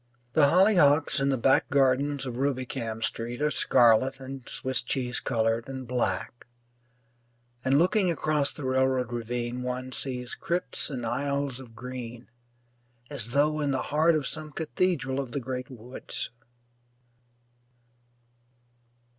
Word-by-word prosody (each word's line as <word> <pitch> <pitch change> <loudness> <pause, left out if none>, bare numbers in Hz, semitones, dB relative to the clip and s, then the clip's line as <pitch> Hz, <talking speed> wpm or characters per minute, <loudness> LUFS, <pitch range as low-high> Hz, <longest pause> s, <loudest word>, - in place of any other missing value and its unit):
The 150 -2 +6
hollyhocks 165 -5 +4
in 135 0 +1
the 135 - +2
back 135 +3 +3
gardens 140 +1 +2
of 125 -2 -5
Rubicam 130 -4 -2
Street 115 +2 -3
are 150 +1 +1
scarlet 125 +2 +4
and 135 -1 -8
Swiss 130 -2 -1
cheese 125 0 -1
coloured 115 0 0
and 130 -2 -6
black; 120 -2 -2 1.2
and 135 +1 +3
looking 185 +4 +3
across 155 -3 +1
the 150 - -9
railroad 130 -2 +1
ravine 120 +1 -3
one 125 +1 -4
sees 125 -1 -3
crypts 175 0 -1
and 125 -5 -4
aisles 140 +1 -1
of 120 -4 -12
green 120 0 -8 0.8
as 120 -4 -4
though 150 +2 +3
in 145 -1 0
the 135 -1 0
heart 160 +2 +4
of 150 -3 -1
some 155 -1 -4
cathedral 155 -4 -1
of 130 -4 -4
the - - -1
great 125 0 -5
woods. 125 -1 -6
130 Hz, 130 wpm, -28 LUFS, 120-145 Hz, 1.2 s, The